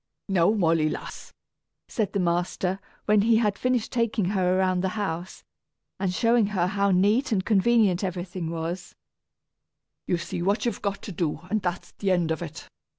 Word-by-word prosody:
"Now, 185 -3 +3
Molly, 165 -7 +2
lass," - - -7 0.6
said 215 -6 -2
the 200 - 0
master, 180 +2 0 0.3
when 210 -1 +4
he 225 +2 +4
had 210 -3 +2
finished 250 -3 0
taking 230 -4 0
her 185 -2 +2
around 185 -1 +2
the 190 - 0
house, 185 -3 -4 0.6
and 190 -2 0
showing 230 +3 +3
her 190 -4 0
how 200 +2 +1
neat 205 +9 +3
and 195 -3 +1
convenient 210 -3 +3
everything 180 -2 -3
was; 165 +2 -5 1.1
"you 175 - +1
see 170 - -5
what 205 +5 +1
you've 235 -4 -2
got 200 -1 -3
to - - -6
do, 160 -3 -2
and 215 -1 +1
that's 175 -1 -3
the 200 - 0
end 175 -3 +2
of 160 - -2
it. 160 -2 -7
190 Hz, 170 wpm, -26 LUFS, 175-210 Hz, 1.1 s, when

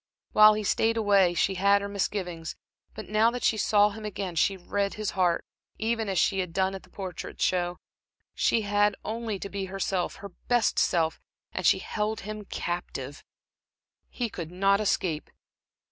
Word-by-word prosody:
While 215 0 +8
he 215 - -2
stayed 225 +3 +1
away 200 -5 +4
she 195 - +2
had 200 +2 +4
her - - -3
misgivings, 185 -4 -3 0.4
but 215 - -7
now 215 +2 +4
that 245 +1 -5
she - - +3
saw 210 0 +3
him 220 +1 -9
again, 195 -4 -4
she 195 +4 +2
read 200 +2 -2
his 215 -1 -2
heart, 180 -3 +1 0.3
even 225 -1 -1
as 190 - -1
she 195 +3 +2
had 180 -3 -3
done 190 +1 +1
at 190 - -6
the - - -20
Portrait 185 -4 -7
Show. 175 -1 +1 0.6
She 230 - +2
had 205 0 +2
only 225 -2 -3
to 195 - -6
be 195 0 -4
herself, 190 -1 -2
her 200 - -9 0.2
best 240 -2 +2
self, 165 -3 +1 0.3
and 185 - 0
she - - +5
held 210 +3 -3
him 215 +1 -7
captive, 145 -7 -5 0.9
he 245 - -2
could 170 -7 -6
not 195 +3 +2
escape. 175 -6 -1
200 Hz, 175 wpm, -27 LUFS, 180-215 Hz, 0.9 s, While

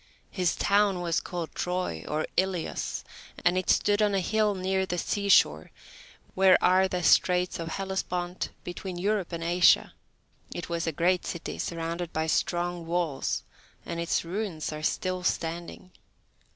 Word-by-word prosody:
His 180 -3 0
town 200 -2 +2
was 170 -1 +1
called 175 -3 -5
Troy, 180 - -2
or 155 +1 -1
Ilios, 185 -3 -1 0.4
and 175 0 +4
it 185 0 -1
stood 205 0 +3
on 205 -1 +3
a - - +3
hill 210 +2 +1
near 190 0 0
the 180 -1 -2
seashore, 180 - +3 0.6
where 190 -1 +6
are 185 +1 +4
the 180 -1 -3
straits 180 +1 +3
of 165 - -4
Hellespont, 180 -1 -3
between 180 +1 -6
Europe 200 0 0
and 165 -1 -4
Asia; 175 +1 +4 0.6
it 175 - -5
was 170 0 -2
a - - +1
great 175 +4 +1
city 170 - -5
surrounded 170 0 -3
by 160 0 0
strong 175 +1 -1
walls, 170 -5 -1 0.4
and 170 - -4
its 170 0 0
ruins 175 -4 -3
are 155 - -6
still 185 +3 -1
standing. 170 +1 -3
180 Hz, 150 wpm, -28 LUFS, 170-190 Hz, 0.6 s, where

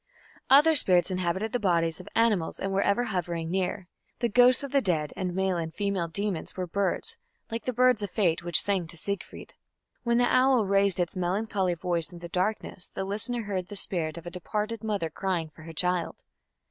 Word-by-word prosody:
Other 295 +4 +7
spirits 185 - +3
inhabited 185 +4 -1
the 245 - 0
bodies 170 -4 +1
of 185 - -11
animals 220 -7 +2
and 195 - -2
were 195 - +2
ever 200 +5 +2
hovering 175 -6 -3
near. 185 0 -2 0.3
The 235 - 0
ghosts 250 +4 +5
of 280 - -5
the 280 -1 +3
dead 160 - 0
and 180 -2 -3
male 190 -1 0
and 165 -1 -3
female 200 -2 -1
demons 195 0 -3
were 185 - -2
birds, 190 +2 -1 0.3
like 230 +1 -4
the 255 - 0
birds 250 -2 +3
of 205 - -3
Fate 175 -5 +1
which 175 -2 +4
sang 190 -4 0
to 170 - -7
Siegfried. 200 +3 -6 0.5
When 235 -1 +1
the 245 - +4
owl 255 -2 +4
raised 195 -1 +2
its 175 +1 -1
melancholy 185 0 -1
voice 170 -1 +3
in 175 - -10
the 170 0 -9
darkness 185 0 -2
the - - -5
listener 220 +4 -2
heard 190 -4 -3
the 205 - -8
spirit 170 -5 -2
of 170 - -9
a 175 - -6
departed 210 +5 -3
mother 200 -7 -2
crying 175 -3 -2
for 155 - -16
her 165 +1 -9
child. 180 +1 0
190 Hz, 200 wpm, -27 LUFS, 175-215 Hz, 0.5 s, Other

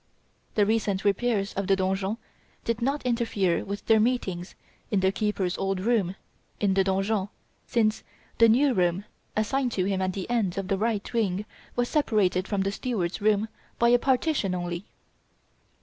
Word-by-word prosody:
The 210 - +4
recent 210 -3 0
repairs 205 0 +1
of 195 -1 -2
the 195 - +4
donjon 190 +2 -1 0.5
did 230 0 -1
not 275 +4 -1
interfere 225 -7 +1
with 200 +1 -5
their 225 -1 +5
meetings 200 -7 -1 0.3
in 200 -3 +1
the 190 0 +3
keeper's 200 -3 -1
old 195 -1 0
room, 195 -3 +1 0.4
in 200 -2 +2
the 195 0 +3
donjon, 195 +1 0 0.4
since 220 -2 +1 0.4
the 230 0 +7
new 265 +4 +4
room 180 0 +1 0.3
assigned 245 +3 0
to 185 - 0
him 195 -1 0
at 185 0 0
the 190 -1 -4
end 215 -7 0
of 195 -1 -3
the 195 - +1
right 220 +1 -1
wing 210 -3 0 0.3
was 245 0 +1
separated 200 - +1
from 200 -2 0
the 195 +1 0
steward's 200 -6 -2
room 210 0 +2 0.3
by 235 - +4
a 245 0 +5
partition 260 - +1
only. 175 +1 -4
205 Hz, 165 wpm, -27 LUFS, 190-230 Hz, 0.5 s, the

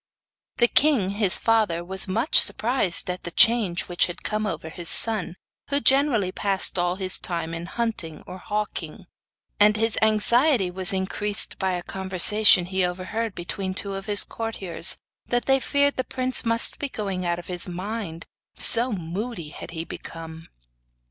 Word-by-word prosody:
The 240 - +4
king 255 -9 +2
his 200 -1 0
father 210 -7 +1
was 190 +2 +3
much 225 - +4
surprised 210 -2 +1
at 180 0 -4
the - - -6
change 205 -2 +4
which 175 - +1
had 175 0 -9
come 215 0 -2
over 160 -4 -5
his 170 +1 -4
son, 210 -6 +4 0.3
who 280 0 +1
generally 270 -9 +2
passed 195 -1 0
all 175 0 0
his 185 -1 0
time 165 -2 -4
in 165 +1 -6
hunting 190 -8 -4
or 185 +1 -9
hawking, 205 -3 -5 0.5
and 210 +1 +5
his 225 -1 +1
anxiety 220 - +3
was 185 0 0
increased 200 +2 -2
by 190 -1 0
a 175 -1 -3
conversation 190 +1 +2
he 190 +1 -1
overheard 185 +5 -3
between 185 +2 -4
two 200 0 -5
of 195 +2 -7
his 205 -1 +6
courtiers 195 -6 -4 0.3
that 245 -1 -1
they 270 0 +3
feared 285 +1 +1
the 255 - 0
prince 255 0 -1
must 230 -1 0
be 285 - -3
going 195 -6 -4
out 175 -1 -1
of 175 - -9
his 180 0 -3
mind, 180 -2 -6 0.3
so 240 +2 +2
moody 180 0 -5
had 150 - -9
he 165 -1 -5
become. 165 -1 -8
195 Hz, 165 wpm, -24 LUFS, 180-225 Hz, 0.5 s, his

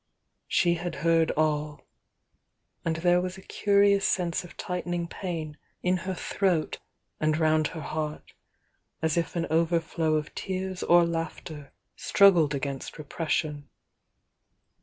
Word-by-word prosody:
She 175 -1 +3
had 175 0 -4
heard 165 -1 +4
all, 150 -1 0 0.5
— - - -50
and 165 -1 0
there 175 +2 +3
was 185 +1 -4
a - - -11
curious 200 0 +3
sense 175 -2 0
of 175 - -13
tight 180 0 -4
ening 175 -1 -2
pain 160 -5 -5 0.3
in 180 0 +2
her 185 +1 -4
throat 180 -4 0 0.4
and 155 0 +1
round 155 -1 +3
her 160 - -7
heart, 155 0 -5 0.7
as 160 -1 +2
if 170 +1 -1
an 170 -1 0
overflow 165 -1 +1
of 150 -1 -2
tears 185 0 -4
or 175 0 +5
laughter 165 -3 -5 0.2
struggled 175 -8 +4
against 140 -1 -4
repression. 150 -1 -2
165 Hz, 135 wpm, -27 LUFS, 155-180 Hz, 0.7 s, or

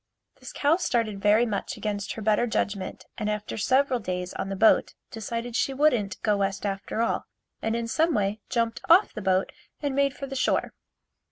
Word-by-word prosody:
This - - -9
cow 300 +3 +2
started 230 - -1
very 210 +3 +4
much 205 -4 -3
against 205 -2 -3
her 220 - -7
better 215 +3 +2
judgment 200 -4 -2
and 210 -1 -1
after 210 0 -3
several 260 +3 +2
days 180 -3 -4
on 195 - -4
the 195 - -3
boat 220 +3 +4 0.2
decided 230 +1 -4
she 270 +1 0
wouldn't 245 -9 +2
go 210 -2 +2
west 195 0 -1
after 200 +3 -2
all 230 - -1 0.3
and 225 +1 -1
in 235 0 -2
some 320 +6 +2
way 205 +1 0
jumped 230 -2 0
off 360 +5 +6
the 215 - -5
boat 190 -1 +1 0.3
and 285 -2 -2
made 280 0 +1
for 275 - -5
the 270 0 -7
shore. 255 - 0
220 Hz, 190 wpm, -26 LUFS, 200-255 Hz, 0.3 s, off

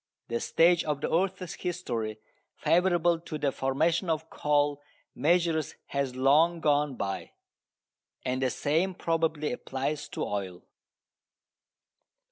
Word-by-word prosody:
The 115 0 -1
stage 170 +5 +4
of 150 -2 -1
the - - -2
earth's 185 0 -1
history 120 -12 -3 0.4
favourable 175 -1 +3
to 160 -2 -6
the 145 -2 0
formation 160 +8 0
of 160 0 -2
coal 145 -1 +1 0.3
measures 165 0 +1
has 140 -2 -2
long 150 +6 +4
gone 145 -3 +2
by. 100 -4 -4 0.9
And 130 +1 -1
the 130 - +2
same 165 +9 0
probably 160 -3 0
applies 145 +4 -3
to - - -3
oil. 95 -3 -4
150 Hz, 115 wpm, -29 LUFS, 135-170 Hz, 0.9 s, stage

